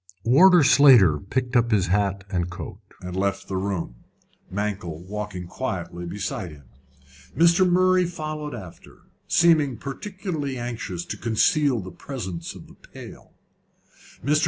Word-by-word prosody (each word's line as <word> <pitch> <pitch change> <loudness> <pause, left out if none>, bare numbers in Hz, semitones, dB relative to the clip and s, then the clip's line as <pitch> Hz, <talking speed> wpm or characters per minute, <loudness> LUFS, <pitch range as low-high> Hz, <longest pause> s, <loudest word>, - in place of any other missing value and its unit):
Warder 170 +8 +6
Slater 125 - +6
picked 125 +5 -3
up 120 -1 +3
his 105 -5 +2
hat 100 +1 0
and 90 -2 -1
coat, 85 - -8 0.2
and 90 0 -6
left 100 +1 -1
the 95 - -4
room, 95 -10 -3 0.5
Mankell 100 -5 -3
walking 100 -2 -5
quietly 90 -4 -5
beside 95 -1 -4
him. 75 -3 -14 0.7
Mr. 170 +2 +5
Murray 185 0 +3
followed 155 -4 -5
after, 95 -7 -12 0.2
seeming 155 -7 +3
particularly 155 - -5
anxious 115 -7 -5
to - - -6
conceal 120 +3 +2
the 95 0 -9
presence 95 -7 -6
of - - -12
the - - -16
pail. - - -13 0.9
Mr. 150 +2 +3
110 Hz, 135 wpm, -24 LUFS, 95-145 Hz, 0.9 s, Warder